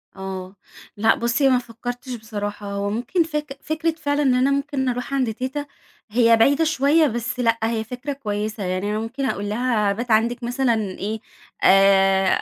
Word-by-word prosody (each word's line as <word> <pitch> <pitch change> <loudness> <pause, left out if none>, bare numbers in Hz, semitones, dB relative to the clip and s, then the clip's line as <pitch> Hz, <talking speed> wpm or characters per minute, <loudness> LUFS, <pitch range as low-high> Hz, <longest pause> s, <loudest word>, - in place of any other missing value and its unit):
آه، 190 0 -6 0.4
لأ، 225 +2 +4
بُصّي 235 +4 +2
ما 255 - +4
فكّرتش 245 +1 -6
بصراحة 205 -2 -5
هو 200 0 -2
ممكن 245 - 0
فك 300 -3 -5
فكرة 315 +1 0
فعلًا، 295 -2 -1
إن 265 -3 +3
أنا 260 +2 +3
ممكن 280 -2 -1
أروح 250 +2 -4
عند 255 -5 0
تيتة، 260 +5 -4 0.4
هي 230 +1 +4
بعيدة 280 +7 +4
شويّة، 310 0 +3
بس 240 0 -3
لأ، 230 -2 +2
هي 225 0 0
فكرة 250 +5 -5
كويّسة، 215 -4 -4
يعني 185 +2 -2
أنا 215 - -1
ممكن 245 +5 -4
أقول 205 -5 -2
لها 215 -2 +1
أبات 235 +4 -3
عندِك 235 +3 +2
مثلًا 245 +1 +1
إيه، 205 +3 -4 0.4
آآ 195 0 +5
235 Hz, 170 wpm, -22 LUFS, 210-270 Hz, 0.4 s, آآ